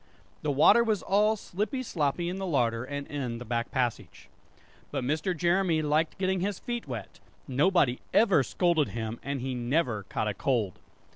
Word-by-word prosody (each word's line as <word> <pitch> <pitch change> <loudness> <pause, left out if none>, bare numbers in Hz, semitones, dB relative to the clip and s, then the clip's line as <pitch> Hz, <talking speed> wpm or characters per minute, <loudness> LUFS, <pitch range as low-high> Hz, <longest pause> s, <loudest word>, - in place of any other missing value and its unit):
The 150 - -2
water 155 - +6
was 220 -4 0
all 210 +2 +3
slippy 215 +6 -3
sloppy 170 - -1
in 180 +2 -3
the 195 0 -3
larder 120 -7 +1
and 145 +2 -5
in 130 -6 -4
the 120 - -8
back 115 0 -2
passage. 125 -3 -3 0.6
But - - -3
Mr. 160 +7 -1
Jeremy 175 -1 +2
liked 155 +2 +1
getting 190 0 0
his 195 +1 -1
feet 240 -7 -5
wet; 115 -7 -7 0.3
nobody 140 -1 +2
ever 200 -9 +5
scolded 165 +1 +1
him, 110 0 -4
and 140 -2 -3
he 130 +1 -3
never 120 -2 0
caught 110 - -1
a 105 - 0
cold! 110 -6 -1
150 Hz, 170 wpm, -28 LUFS, 125-185 Hz, 0.6 s, water